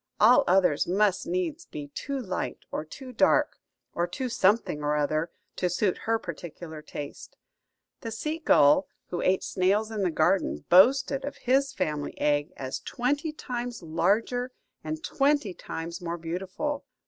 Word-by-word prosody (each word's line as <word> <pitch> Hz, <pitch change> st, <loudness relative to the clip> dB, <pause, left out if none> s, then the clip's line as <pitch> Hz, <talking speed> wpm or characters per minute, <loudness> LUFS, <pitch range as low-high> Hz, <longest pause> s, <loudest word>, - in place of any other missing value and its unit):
All 235 Hz, +4 st, +7 dB
others 180 Hz, -5 st, +3 dB
must 195 Hz, -, +2 dB
needs 345 Hz, -2 st, -2 dB
be 145 Hz, -1 st, -7 dB
too 275 Hz, -, -4 dB
light 190 Hz, -7 st, -3 dB
or -, -, -2 dB
too 255 Hz, -, -10 dB
dark, -, -, +3 dB, 0.3 s
or 175 Hz, +1 st, 0 dB
too 255 Hz, +8 st, -4 dB
something 205 Hz, -7 st, +2 dB
or 150 Hz, 0 st, +1 dB
other, 155 Hz, +3 st, 0 dB, 0.3 s
to 180 Hz, -, +1 dB
suit 180 Hz, +2 st, +1 dB
her 225 Hz, -, +4 dB
particular 170 Hz, -4 st, -8 dB
taste. 145 Hz, -1 st, -8 dB, 0.6 s
The 230 Hz, -, -5 dB
sea 305 Hz, +9 st, -3 dB
gull, 150 Hz, -, +5 dB, 0.2 s
who 175 Hz, -, -2 dB
ate 185 Hz, 0 st, +2 dB
snails 200 Hz, +4 st, +1 dB
in 215 Hz, -2 st, -2 dB
the 185 Hz, -, +2 dB
garden, 155 Hz, -, +1 dB
boasted 265 Hz, +9 st, +5 dB
of 285 Hz, -, -4 dB
his 270 Hz, +2 st, +2 dB
family 150 Hz, -, -3 dB
egg 145 Hz, 0 st, +1 dB
as 130 Hz, -1 st, -4 dB
twenty 290 Hz, +6 st, -1 dB
times 245 Hz, -, -5 dB
larger 215 Hz, +10 st, +1 dB, 0.3 s
and 155 Hz, 0 st, -4 dB
twenty 275 Hz, -8 st, +1 dB
times 170 Hz, 0 st, -6 dB
more 170 Hz, 0 st, -3 dB
beautiful. 190 Hz, -, -3 dB
190 Hz, 150 wpm, -27 LUFS, 160-250 Hz, 0.6 s, All